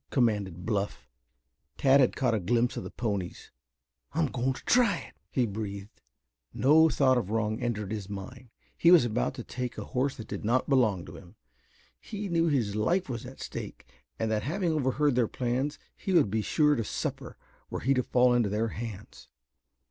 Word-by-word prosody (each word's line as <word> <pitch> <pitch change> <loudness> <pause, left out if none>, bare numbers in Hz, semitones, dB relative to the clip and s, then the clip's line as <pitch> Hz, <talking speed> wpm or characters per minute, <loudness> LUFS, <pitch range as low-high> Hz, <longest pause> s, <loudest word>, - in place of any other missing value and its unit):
commanded 105 -8 0
Bluff. 105 -3 -2 0.7
Tad 135 +1 +5
bad 130 - +3
caught 125 -3 +1
a 110 - +1
glimpse 120 +6 +1
of - - -4
the - - -6
ponies. 100 -7 -4 0.6
"I'm 160 +2 +2
going 130 -1 -1
to - - -12
try 235 -7 +4
it," - - -10 0.2
he 125 - +1
breathed. 100 -1 -6 0.5
No 160 +4 +5
thought 130 -4 +3
of 100 - -5
wrong 110 +1 -1
entered 105 -4 -2
his 105 -3 -4
mind. 115 +6 -8 0.3
He 170 - +4
was 175 -8 +7
about 105 - -1
to - - -6
take 125 -1 -5
a - - -5
horse 130 +2 -1
that 110 - -8
did - - -5
not 120 +4 +1
belong 110 - +2
to 80 - -10
him. 90 +1 -15 0.6
He 205 -2 -6
knew 170 -1 +2
his 120 -10 0
life 170 - +1
was 120 -3 -5
at - - -11
stake - - -7 0.3
and 110 0 -1
that 105 -1 +1
having 170 - -1
overheard 145 -1 +1
their 120 -2 +2
plans 130 +5 -2 0.2
he 190 - -3
would 140 - +4
be 110 0 +1
sure 150 +7 +3
to 115 - 0
suffer - - -4 0.3
were - - -4
he 135 - +3
to 130 - +2
fall 125 0 +3
into 120 -4 +2
their 110 +3 0
hands. 105 - -8
120 Hz, 190 wpm, -29 LUFS, 105-135 Hz, 0.7 s, was